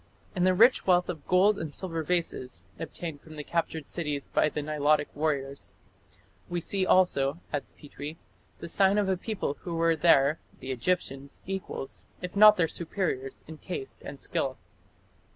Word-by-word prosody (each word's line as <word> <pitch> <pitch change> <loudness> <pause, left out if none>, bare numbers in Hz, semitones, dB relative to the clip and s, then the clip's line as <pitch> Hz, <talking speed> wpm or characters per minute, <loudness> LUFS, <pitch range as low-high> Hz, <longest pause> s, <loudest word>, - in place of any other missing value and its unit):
"In 180 -1 +2
the 185 0 +4
rich 235 +4 +5
wealth 180 -1 +4
of 160 -5 -6
gold 195 +3 +4
and 160 -2 -4
silver 165 +1 -2
vases", 150 - -2 0.2
obtained 160 -5 -6
from 155 -1 -12
captured 160 -2 -2
cities 150 -5 -3
by 155 - +3
the 150 - -4
Nilotic 150 0 +1
warriors, 140 -2 -2 0.7
"we 175 - -1
see 190 +2 -1
also", 150 -5 +3
adds 145 - -3
Petrie, 145 +2 -8 0.4
"the 170 - -5
sign 195 +3 +3
of 205 -2 +2
a 190 - +2
people 185 -7 -3
who 170 -2 -4
were 165 0 +3
their 150 -2 +4 0.2
(the 130 - -5
Egyptians') 135 0 -2
equals, 190 -7 -5 0.2
if 180 +1 -6
not 210 +1 +8
their 165 -2 +3
superiors 160 -6 -3
in 160 -1 -10
taste 405 -2 -6
and - - -8
skill." - - -2
165 Hz, 160 wpm, -28 LUFS, 145-185 Hz, 0.7 s, not